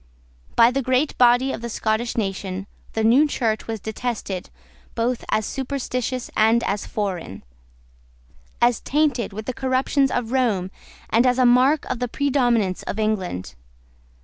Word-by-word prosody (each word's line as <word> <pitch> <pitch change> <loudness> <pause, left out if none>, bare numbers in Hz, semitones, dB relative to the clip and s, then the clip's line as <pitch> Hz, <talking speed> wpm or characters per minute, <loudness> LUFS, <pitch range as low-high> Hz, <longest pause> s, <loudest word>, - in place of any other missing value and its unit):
By 230 +1 +6
the 275 +2 0
great 260 +3 +1
body 245 +2 +5
of - - -6
the 235 - -5
Scottish 220 +2 -1
nation 195 -2 -3 0.3
the 220 - -1
new 255 +7 +5
Church 225 -6 -1
was 225 -1 -3
detested 220 -4 -4 0.5
both 240 +1 -1
as 215 - +1
superstitious 255 -2 -3
and 225 +2 +4
as 200 0 -2
foreign; 185 - -4 1.2
as 240 -1 +3
tainted 280 -6 0
with 215 +2 -7
the 255 - -3
corruptions 265 +2 +1
of 245 -2 -2
Rome, 215 -8 +1 0.4
and 235 +3 +4
as 250 0 +2
a 255 - +4
mark 255 +5 +4
of 255 - -3
the 250 - -1
predominance 245 -8 +1
of - - -5
England. 190 - -2
235 Hz, 150 wpm, -22 LUFS, 215-255 Hz, 1.2 s, By